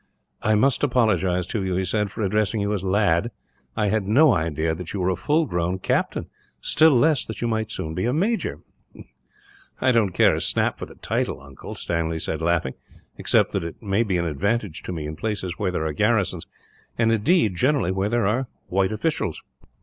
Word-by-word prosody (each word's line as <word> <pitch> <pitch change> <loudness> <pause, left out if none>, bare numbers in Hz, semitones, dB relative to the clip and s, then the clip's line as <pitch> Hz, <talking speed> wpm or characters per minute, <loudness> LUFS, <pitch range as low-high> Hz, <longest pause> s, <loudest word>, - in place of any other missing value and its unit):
"I 110 - +2
must 130 +4 +3
apologize 110 -9 +2
to 100 +2 -3
you," 95 -1 -1
he 95 +1 0
said, 105 +2 0
"for 110 - -4
addressing 105 +1 +1
you 100 +1 0
as 100 -3 -2
'lad.' 95 +1 +2 0.5
I 105 -2 +2
had 105 -2 0
no 135 +6 +5
idea 80 -2 0
that 85 +1 -7
you 100 - -3
were 90 0 +1
a - - 0
full 155 - +1
grown 90 - -1
captain, 95 - -1 0.3
still 155 - +4
less 150 +1 +3
that 110 - -6
you 120 - -1
might 110 -1 -1
soon 80 0 -4
be 90 +6 -2
a 120 - +1
major." 205 - -1 1.2
"I 130 - +3
don't 115 -5 +3
care - - +4
a - - -2
snap - - +1
for - - -5
the - - -14
title, - - -2
uncle," 70 0 -10
Stanley 80 -1 -2
said, 80 0 -3
laughing, 80 -5 0 0.5
"except - - +2
that - - -1
it 85 - -7
may 100 +1 +1
be 100 -6 0
an 85 - -1
advantage 100 +3 -1
to - - -4
me, 80 -4 -4
in 75 +1 -5
places 95 -3 -4
where - - 0
there 85 -3 -2
are 80 - -1
garrisons; 100 -2 +1 0.5
and 115 -1 +3
indeed, 115 - +2
generally 130 -3 +2
where 95 +2 -1
there 120 -1 +1
are 120 +6 0 0.2
white 95 +1 +1
officials." 110 - -2
100 Hz, 205 wpm, -23 LUFS, 85-115 Hz, 1.2 s, no